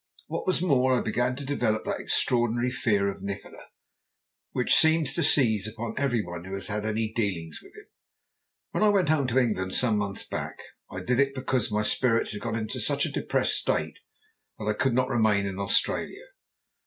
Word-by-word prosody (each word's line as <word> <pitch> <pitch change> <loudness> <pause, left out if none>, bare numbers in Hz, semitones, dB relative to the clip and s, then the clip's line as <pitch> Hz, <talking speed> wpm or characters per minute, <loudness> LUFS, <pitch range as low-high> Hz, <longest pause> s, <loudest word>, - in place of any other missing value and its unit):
What - - -5
was 185 -2 +1
more, 130 -6 +3
I - - 0
began 120 +3 0
to 140 +1 -7
develop 115 -6 0
that - - -2
extraordinary 120 0 +1
fear 105 -5 +1
of 100 - -4
Nikola 100 0 -7 0.9
which 125 - +1
seems 160 -3 +4
to - - 0
seize 110 -7 +3
upon 115 +1 -5
every 125 -6 0
one 85 -1 -7
who 95 +1 -6
has 95 -1 -6
any 110 +1 -2
dealings 90 -8 -2
with - - -18
him. - - -13 0.9
When - - -2
I 210 - +6
went 190 -6 +2
home 150 -4 +2
to 125 +1 -1
England 105 -7 +1
some 115 -4 +2
months 100 -1 -3
back, - - -5 0.3
I - - -6
did 125 +1 0
it 135 0 +2
because 130 -4 -1
my 105 +1 +1
spirits 115 +1 +2
had 105 -1 -6
got 115 0 -3
into 110 -1 -3
such - - +1
a - - -4
depressed - - +1
state - - -1 0.6
that 110 - -6
I 105 - +1
could 120 +3 0
not 130 0 +2
remain 110 -5 +2
in 95 0 -4
Australia. 100 0 -1
115 Hz, 190 wpm, -27 LUFS, 105-130 Hz, 0.9 s, I